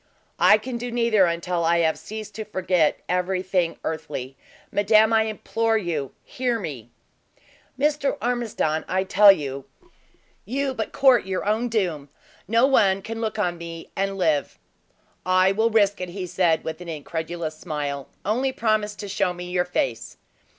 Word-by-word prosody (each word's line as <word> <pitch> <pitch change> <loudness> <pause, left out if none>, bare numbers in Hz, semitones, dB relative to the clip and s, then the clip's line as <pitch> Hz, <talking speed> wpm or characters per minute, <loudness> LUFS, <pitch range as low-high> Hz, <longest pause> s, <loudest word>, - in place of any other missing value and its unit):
"I 185 +5 +7
can 235 +2 -5
do 245 +1 -4
neither 230 -5 +3
until 170 +1 -1
I 170 +1 +3
have 160 -1 +2
ceased 215 -1 -8
to 220 - -5
forget 185 -6 +1
every 180 +1 0
thing 180 -3 0
earthly. 145 -4 -5 0.4
Madame, 215 +2 +4
I 220 0 +4
implore 225 +1 0
you, 165 -9 -3
hear 250 -2 -2
me!" 135 - -7 0.9
"Mr. 290 0 +1
Ormiston, 230 -10 -1
I 190 0 0
tell 200 +2 +7
you, 140 -6 -3 0.8
you 270 +5 -2
but 225 -3 -4
court 255 -7 +4
your 190 0 -2
own 220 +4 0
doom. 175 -10 -1 0.4
No 230 +5 +4
one 195 -8 +3
can 225 0 -5
look 220 -1 -2
on 175 -5 -1
me 165 -1 -8
and 195 0 -1
live!" 155 -6 0 0.7
"I 185 +1 +4
will 220 +3 +2
risk 205 -3 +2
it," 180 - -4
he 185 +1 -5
said 175 -2 +1
with 160 +1 -5
an 175 - -8
incredulous 160 +1 -4
smile. 145 -4 -4 0.2
"Only 250 +6 +1
promise 215 -4 0
to 205 - -7
show 185 -2 0
me 180 0 -7
your 180 0 +1
face." 120 -9 -2
190 Hz, 160 wpm, -24 LUFS, 170-220 Hz, 0.9 s, I